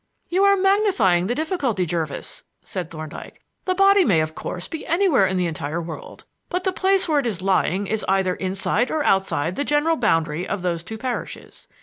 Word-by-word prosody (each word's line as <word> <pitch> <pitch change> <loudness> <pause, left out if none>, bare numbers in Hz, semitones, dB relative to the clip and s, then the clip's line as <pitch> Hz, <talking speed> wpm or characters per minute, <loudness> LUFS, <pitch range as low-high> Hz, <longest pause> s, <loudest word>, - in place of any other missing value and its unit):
"You 370 +3 +2
are 400 0 +5
magnifying 370 - +3
the 240 - -1
difficulty, 285 - -1
Jervis," 160 -3 -3 0.2
said 180 -4 -5
Thorndyke. 155 -2 -9 0.3
"The 370 - 0
body 395 0 +5
may, 185 - +3
of 155 0 -3
course, 180 +2 -5
be 320 - -6
anywhere 335 - +3
in 185 - -1
the 180 - +1
entire 160 -1 -3
world, 165 -1 -8 0.2
but 360 +1 -2
the 375 - +1
place 380 0 +2
where 305 -3 +3
it 260 - -1
is 190 -5 -3
lying 195 0 +1
is 215 +2 -2
either 190 -1 +2
inside 195 +6 -1
or 310 -1 0
outside 185 - +1
the 285 - 0
general 295 +3 +2
boundary 165 - 0
of 195 -2 -3
those 170 -2 -1
two 220 +5 -7
parishes. 250 +1 -6
200 Hz, 195 wpm, -22 LUFS, -, 0.3 s, are